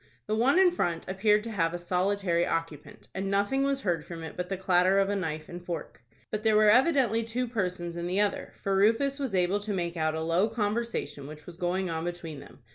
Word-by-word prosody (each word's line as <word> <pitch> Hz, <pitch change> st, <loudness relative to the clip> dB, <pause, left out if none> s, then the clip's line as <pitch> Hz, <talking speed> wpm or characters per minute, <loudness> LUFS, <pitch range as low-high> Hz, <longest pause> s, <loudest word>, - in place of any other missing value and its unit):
The 215 Hz, -, -1 dB
one 255 Hz, +9 st, +3 dB
in 375 Hz, -1 st, +6 dB
front 170 Hz, -, -2 dB
appeared 210 Hz, +3 st, +2 dB
to 230 Hz, -, -6 dB
have 170 Hz, -4 st, 0 dB
a -, -, -2 dB
solitary 180 Hz, 0 st, 0 dB
occupant, 165 Hz, -4 st, -4 dB
and 195 Hz, +1 st, -3 dB
nothing 205 Hz, +7 st, +1 dB
was 275 Hz, 0 st, 0 dB
heard 170 Hz, -, -1 dB
from 165 Hz, -1 st, -8 dB
it 160 Hz, -, -7 dB
but 180 Hz, 0 st, -4 dB
the 195 Hz, -, -2 dB
clatter 185 Hz, 0 st, +3 dB
of 195 Hz, 0 st, +3 dB
a 205 Hz, -, 0 dB
knife 155 Hz, -5 st, -3 dB
and 175 Hz, 0 st, -8 dB
fork. 170 Hz, -9 st, -6 dB, 0.3 s
But 215 Hz, -, -2 dB
there 220 Hz, -1 st, +3 dB
were 215 Hz, 0 st, +6 dB
evidently 255 Hz, -3 st, +3 dB
two 240 Hz, +3 st, -2 dB
persons 180 Hz, -6 st, -3 dB
in 170 Hz, 0 st, -3 dB
the 185 Hz, +3 st, 0 dB
other, 205 Hz, -1 st, -1 dB
for 195 Hz, -1 st, +1 dB
Rufus 230 Hz, +8 st, +2 dB
was 265 Hz, -8 st, -2 dB
able 185 Hz, +2 st, +2 dB
to 205 Hz, 0 st, -4 dB
make 175 Hz, -2 st, -2 dB
out 155 Hz, -1 st, 0 dB
a 160 Hz, -, -2 dB
low 170 Hz, +6 st, +2 dB
conversation 210 Hz, -10 st, -2 dB
which 155 Hz, +1 st, -11 dB
was 175 Hz, -, -10 dB
going 180 Hz, 0 st, -1 dB
on 160 Hz, 0 st, -3 dB
between 170 Hz, -4 st, -5 dB
them. 135 Hz, -, -15 dB
190 Hz, 230 wpm, -28 LUFS, 170-215 Hz, 0.3 s, in